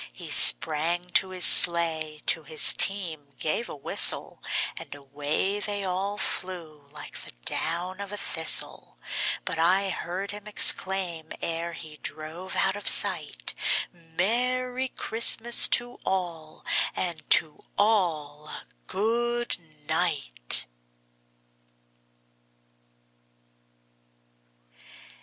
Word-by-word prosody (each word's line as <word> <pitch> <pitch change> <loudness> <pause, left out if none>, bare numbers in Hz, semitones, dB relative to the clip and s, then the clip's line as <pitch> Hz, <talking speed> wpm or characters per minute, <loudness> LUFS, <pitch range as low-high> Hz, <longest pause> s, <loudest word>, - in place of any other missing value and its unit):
He - - -7
sprang 170 - +4
to 190 - +3
his 185 -1 +2
sleigh, 160 -3 +4
to 160 - +2
his 155 +1 +6
team 160 -8 +1
gave 190 +9 -3
a - - -8
whistle, 140 - +1 0.3
And - - -10
away 145 +8 -3
they 205 -1 -4
all 195 +2 -4
flew 165 -8 -5
like 145 -1 -10
the - - -12
down 180 +3 -2
of 200 0 -9
a 205 - -5
thistle; - - +2 0.5
But 170 -3 -4
I 190 +4 +1
heard 185 +3 -6
him 210 0 -10
exclaim, 185 -5 0
ere 170 +1 -5
he 155 -2 -10
drove 160 +5 -8
out 195 0 0
of 205 - -2
sight, - - +1 0.4
"Merry 245 +10 -3
Christmas 235 0 +3
to 245 0 -12
all, 170 -5 -6 0.3
and 175 -3 -4
to 155 -2 -7 0.2
all 160 -8 -2
a - - -8 0.2
good 240 +3 -2 0.3
night!" - - +1
175 Hz, 100 wpm, -24 LUFS, 155-200 Hz, 0.5 s, his